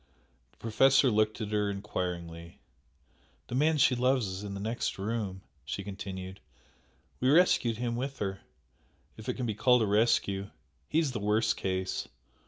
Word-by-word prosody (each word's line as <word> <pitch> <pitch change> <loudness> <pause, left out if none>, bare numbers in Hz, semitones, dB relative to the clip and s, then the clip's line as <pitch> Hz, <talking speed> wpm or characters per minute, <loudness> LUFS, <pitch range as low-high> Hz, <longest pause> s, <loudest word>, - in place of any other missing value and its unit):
The - - -33
Professor 130 +4 +4
looked 110 +1 +1
at 105 -1 -4
her 105 -1 +1
enquiringly. 90 -4 -5 0.9
"The - - -6
man 155 +4 +3
she 135 -2 +5
loves 125 0 +2
is 95 +1 -5
in 100 -1 -5
the - - -5
next 110 +4 -2
room" 100 -2 -3 0.2
she 75 +8 -4
continued 95 -1 -7 0.8
"We 130 - +2
rescued 140 -8 +4
him 120 0 -2
with 135 +3 -3
her 95 -1 -3 0.7
if 110 +2 -8
it 125 - -1
can 125 - -3
be 110 - -1
called 125 +3 +4
a - - +2
rescue. 100 -2 +2 0.4
He 155 - 0
is 160 -4 +2
the 120 - -3
worst 105 +1 +2
case. 95 0 -2
105 Hz, 165 wpm, -30 LUFS, 95-125 Hz, 0.9 s, she